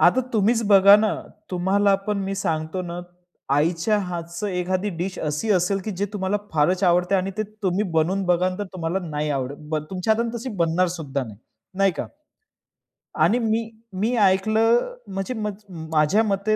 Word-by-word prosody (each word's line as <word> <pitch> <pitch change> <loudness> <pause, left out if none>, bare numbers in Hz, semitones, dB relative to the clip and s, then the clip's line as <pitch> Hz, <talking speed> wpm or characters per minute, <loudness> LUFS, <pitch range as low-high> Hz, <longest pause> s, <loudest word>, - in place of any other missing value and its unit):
आता 180 +9 +5
तुम्हीच 225 +2 +2
बघा 200 0 +8
ना, 215 0 +1 0.4
तुम्हाला 195 +2 +2
पण 210 -1 0
मी 195 - -2
सांगतो 160 -1 -2
ना, 175 0 -5 0.5
आईच्या 165 +7 +2
हातचं 170 0 -4
एखादी 185 +2 -1
डिश 185 +2 -3
अशी 150 +8 -2
असेल, 185 +2 +2
की 215 - -3
जे 200 +2 -1
तुम्हाला 195 0 -1 0.2
फारच 170 +5 +2
आवडतं 180 +2 +3
आहे 185 - +3
आणि 195 - -3
ते - - +2 0.2
तुम्ही 190 +1 +1
बनवून 175 +5 +1
बघाल, 180 +1 +1
तर 205 - -2
तुम्हाला 170 0 -2
नाही 150 0 -2
आवडत. 135 0 -2
बन 155 -1 -1
तुमच्या 190 +3 +1
हाताने 235 +1 -2
तशी 240 +3 -5
बनणारसुद्धा 165 -4 0
नाही. 105 -3 -11 0.4
नाही 195 -2 +4
का? - - -3 1.2
आणि 240 - +3
मी 225 0 0 0.3
मी 240 +3 +1
ऐकलं 220 - +3 0.2
म्हणजे 195 +6 -3
मज 210 -2 -5 0.3
माझ्या 155 +8 +3
मते 205 0 +1
190 Hz, 165 wpm, -23 LUFS, 170-210 Hz, 1.2 s, बघा